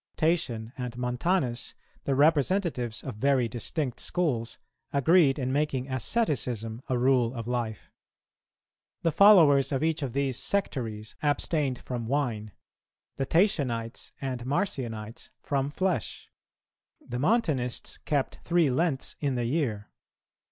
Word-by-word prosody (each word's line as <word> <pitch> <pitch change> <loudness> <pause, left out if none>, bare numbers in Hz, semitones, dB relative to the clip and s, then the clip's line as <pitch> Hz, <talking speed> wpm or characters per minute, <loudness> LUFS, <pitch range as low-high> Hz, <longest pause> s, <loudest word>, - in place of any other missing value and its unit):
Tatian 125 -9 0
and 125 -1 -4
Montanus, 125 +1 -1 0.3
the 135 - +1
representatives 145 - +1
of 130 -6 -6
very 130 0 +2
distinct 125 +3 -3
schools, 125 -10 -1 0.3
agreed 140 0 +4
in 130 -2 -1
making 140 -3 -1
asceticism 125 - -1
a 130 - +1
rule 125 -1 +2
of 115 -1 -5
life. 120 -3 -3 1.1
The 165 - +2
followers 160 -7 +6
of 135 +1 0
each 160 -1 0
of 130 -5 -3
these 135 -2 0
sectaries 115 - -2
abstained 145 -2 +1
from 120 -2 -5
wine; 115 -6 -1 0.7
the 135 - -1
Tatianites 130 - 0
and 130 -3 -4
Marcionites, 120 - -3
from 140 -1 -1
flesh; 175 - -2 0.7
the 120 0 -6
Montanists 150 - 0
kept 145 -3 -1
three 170 -5 +3
Lents 150 0 0
in 140 -3 -1
the 120 -1 -1
year. 120 -6 -1
135 Hz, 120 wpm, -28 LUFS, 120-155 Hz, 1.1 s, followers